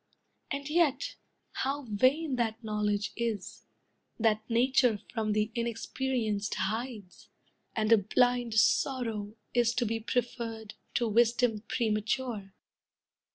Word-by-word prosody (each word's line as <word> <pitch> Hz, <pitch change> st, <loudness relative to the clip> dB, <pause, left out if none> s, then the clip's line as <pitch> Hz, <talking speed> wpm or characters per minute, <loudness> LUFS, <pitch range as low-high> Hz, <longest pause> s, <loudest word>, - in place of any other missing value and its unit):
And 280 Hz, 0 st, -3 dB
yet, 300 Hz, -4 st, +1 dB, 0.4 s
how 280 Hz, +2 st, -2 dB
vain 260 Hz, +7 st, +2 dB
that 230 Hz, -1 st, -1 dB
knowledge 210 Hz, -1 st, -1 dB
is, 225 Hz, -4 st, -3 dB, 0.5 s
That 220 Hz, -1 st, +3 dB
Nature 245 Hz, -1 st, +3 dB, 0.2 s
from 220 Hz, -3 st, 0 dB
the 215 Hz, +1 st, 0 dB
inexperienced 235 Hz, -2 st, -1 dB
hides! 215 Hz, 0 st, -4 dB, 0.5 s
And 220 Hz, 0 st, +1 dB
a 225 Hz, -, +7 dB
blind 245 Hz, +3 st, +2 dB
sorrow 220 Hz, -2 st, +1 dB, 0.2 s
is 240 Hz, -1 st, +3 dB
to 245 Hz, -, +1 dB
be 225 Hz, +1 st, -1 dB
preferred 230 Hz, -2 st, -3 dB, 0.2 s
To 240 Hz, -, +2 dB
wisdom 230 Hz, 0 st, +3 dB
premature!" 215 Hz, -2 st, -1 dB
230 Hz, 110 wpm, -30 LUFS, 215-250 Hz, 0.5 s, a